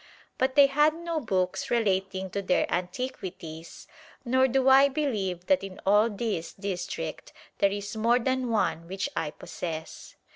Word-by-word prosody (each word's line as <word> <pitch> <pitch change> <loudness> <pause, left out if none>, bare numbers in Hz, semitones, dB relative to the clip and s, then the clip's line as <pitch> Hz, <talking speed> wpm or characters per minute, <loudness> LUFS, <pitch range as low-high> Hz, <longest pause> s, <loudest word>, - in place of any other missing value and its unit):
But 260 +1 +1
they 285 -1 +8
had 295 +3 +3
no 335 -1 -3
books 185 -8 -1
relating 190 -4 0
to 200 - -2
their 185 -2 +2
antiquities 180 -4 -5 0.4
nor 260 +2 +3
do 265 +1 +1
I 270 +1 +7
believe 210 - -2
that 280 +1 +2
in 195 -1 -8
all 210 +3 +5
this 205 -5 -3
district 190 -3 -5 0.3
there 200 - +4
is 205 +1 -5
more 230 +3 +3
than 255 0 -1
one, 170 -7 0
which 190 +2 -3
I 165 -2 -1
possess. 160 +1 -7
205 Hz, 150 wpm, -27 LUFS, 185-260 Hz, 0.4 s, they